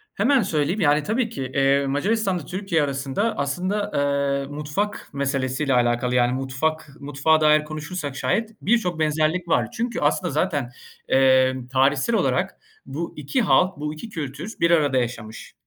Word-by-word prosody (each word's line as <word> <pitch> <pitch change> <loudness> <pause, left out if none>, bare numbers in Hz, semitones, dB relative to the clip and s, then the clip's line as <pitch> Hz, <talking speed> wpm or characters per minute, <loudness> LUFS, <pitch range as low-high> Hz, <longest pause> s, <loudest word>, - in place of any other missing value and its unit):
Hemen 255 +5 +3
söyleyeyim, 175 +2 -1
yani 150 0 +3
tabii 225 +2 0
ki, 135 - -5
eee, 140 0 +3
Macaristan'la 190 - 0
Türkiye 185 -3 -1
arasında 140 +10 -2
aslında, 185 +9 -2
eee, 140 -1 0
mutfak 150 +8 -4
meselesi 135 0 -1
ile 135 -3 +1
alakalı, 120 0 +1
yani 125 0 +3
mutfak 135 +4 -2
mutfağa 145 +3 +1
dair 150 0 +5
konuşursak 155 -1 -5
şayet 210 +10 0
birçok 185 -7 +1
benzerlik 155 +3 0
var. - - +1
Çünkü, 235 +1 -3
aslında - - +1
zaten, - - -1 0.4
eee, 130 -1 +4 0.2
tarihsel 135 - +2
olarak - - 0 0.3
bu 165 +4 -5
2 150 - -1
halk, 185 -4 +3
bu 150 +1 -4
2 220 +9 -9
kültür 155 - -6
bir 170 0 +3
arada 145 -5 +3
yaşamış. 115 -3 -4
150 Hz, 150 wpm, -23 LUFS, 135-185 Hz, 0.4 s, dair